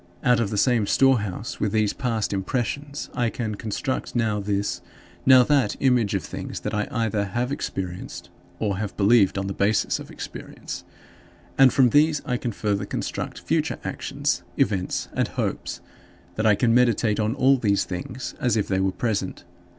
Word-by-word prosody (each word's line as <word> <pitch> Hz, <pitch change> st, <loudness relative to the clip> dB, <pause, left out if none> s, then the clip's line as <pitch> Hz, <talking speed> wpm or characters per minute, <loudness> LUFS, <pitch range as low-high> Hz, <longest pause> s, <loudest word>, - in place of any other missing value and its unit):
Out 125 Hz, -1 st, +4 dB
of 115 Hz, -4 st, 0 dB
the 105 Hz, -, -3 dB
same 115 Hz, -1 st, +3 dB
storehouse, 115 Hz, -6 st, +1 dB
with 105 Hz, -, 0 dB
these 110 Hz, -2 st, +2 dB
past 115 Hz, -6 st, -1 dB
impressions, 130 Hz, +8 st, -3 dB
I 120 Hz, -2 st, +1 dB
can 110 Hz, -2 st, -3 dB
construct 110 Hz, +6 st, -3 dB
now 110 Hz, -3 st, +1 dB
this, 100 Hz, 0 st, -1 dB, 0.5 s
now 130 Hz, -1 st, +9 dB
that, 135 Hz, -5 st, +2 dB
image 125 Hz, -6 st, +2 dB
of -, -, -1 dB
things -, -, -6 dB
that -, -, -4 dB
I 105 Hz, 0 st, 0 dB
either 115 Hz, -6 st, 0 dB
have 120 Hz, +6 st, -2 dB
experienced 95 Hz, -10 st, -5 dB, 0.3 s
or 100 Hz, -3 st, -1 dB
have 105 Hz, -2 st, -4 dB
believed 100 Hz, -1 st, +4 dB
on 95 Hz, -, -1 dB
the 95 Hz, -, -3 dB
basis 100 Hz, +2 st, +1 dB
of -, -, -9 dB
experience -, -, -8 dB, 0.7 s
and 135 Hz, -2 st, +7 dB
from 125 Hz, -3 st, +4 dB
these 150 Hz, +1 st, +4 dB
I 125 Hz, -, 0 dB
can 120 Hz, -, -3 dB
further 105 Hz, -1 st, -1 dB
construct -, -, -4 dB
future -, -, 0 dB
actions, -, -, -2 dB, 0.2 s
events, 95 Hz, -3 st, 0 dB
and -, -, +1 dB
hopes; -, -, -3 dB, 0.5 s
and 110 Hz, +1 st, +1 dB
I 105 Hz, -, +6 dB
can 115 Hz, +1 st, +2 dB
meditate 120 Hz, -3 st, +3 dB
on 110 Hz, +3 st, 0 dB
all 135 Hz, 0 st, +4 dB
these 100 Hz, -5 st, +2 dB
things 95 Hz, +8 st, -5 dB
as 120 Hz, -3 st, +1 dB
if 105 Hz, -, 0 dB
they 95 Hz, -1 st, 0 dB
were 95 Hz, 0 st, +1 dB
present. 100 Hz, 0 st, -2 dB
110 Hz, 175 wpm, -24 LUFS, 100-125 Hz, 0.7 s, now